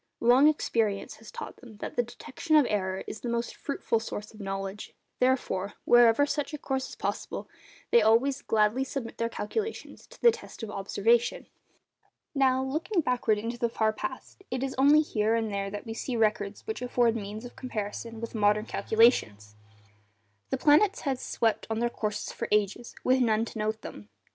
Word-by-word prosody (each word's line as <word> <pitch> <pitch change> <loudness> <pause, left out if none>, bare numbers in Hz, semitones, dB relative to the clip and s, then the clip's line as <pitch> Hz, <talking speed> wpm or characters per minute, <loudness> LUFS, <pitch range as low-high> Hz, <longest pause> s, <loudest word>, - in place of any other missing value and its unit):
Long 250 +5 +6
experience 225 -9 0
has 220 -1 -13
taught - - -8
them 230 -5 -14
that - - -6
the - - +3
detection 245 +6 -3
of 300 -3 +6
error 190 -2 -1
is - - -7
the 240 - -3
most 235 0 -2
fruitful 275 -5 -1
source 210 -1 -6
of 215 - -14
knowledge; 195 0 -5 0.2
therefore, 250 -7 0
wherever 240 +3 +6
such 295 +1 -2
a - - -5
course 265 -2 -3
is - - -9
possible, - - -4 0.4
they 235 - +6
always 235 +6 +3
gladly 220 +4 +2
submit 265 -3 -6
their 230 0 0
calculations 430 - -5
to - - -16
the 475 - +7
test 450 - -10
of 215 - -5
observation. 220 +4 +1 0.9
Now, 265 -2 +3
looking 325 +8 0
backward 245 -5 +1
into 230 +3 -4
the 235 -2 +1
far 220 -1 +1
past, 220 - -7
it 255 0 -2
is 270 -1 -2
only 285 +3 +6
here 220 -7 +1
and 225 -2 -1
there 195 0 -2
that 205 +3 -7
we 225 - -5
see 245 +2 -4
records 210 -2 0
which 440 - -4
afford 245 -2 +2
means 215 +1 -5
of 245 - -10
comparison 225 -1 -5
with 230 0 -6
modern 210 -1 +2
calculations. 195 - +2 0.9
The - - 0
planets 340 +8 +4
had 270 -3 -1
swept 225 -3 0
on 220 - -1
in - - -2
their 240 - +2
courses 210 -2 -3
for - - -4
ages 210 +3 0
with 260 +1 +3
none 225 -2 +2
to 225 - -8
note 215 +1 -1
them. 105 0 -9
230 Hz, 185 wpm, -28 LUFS, 210-260 Hz, 0.9 s, the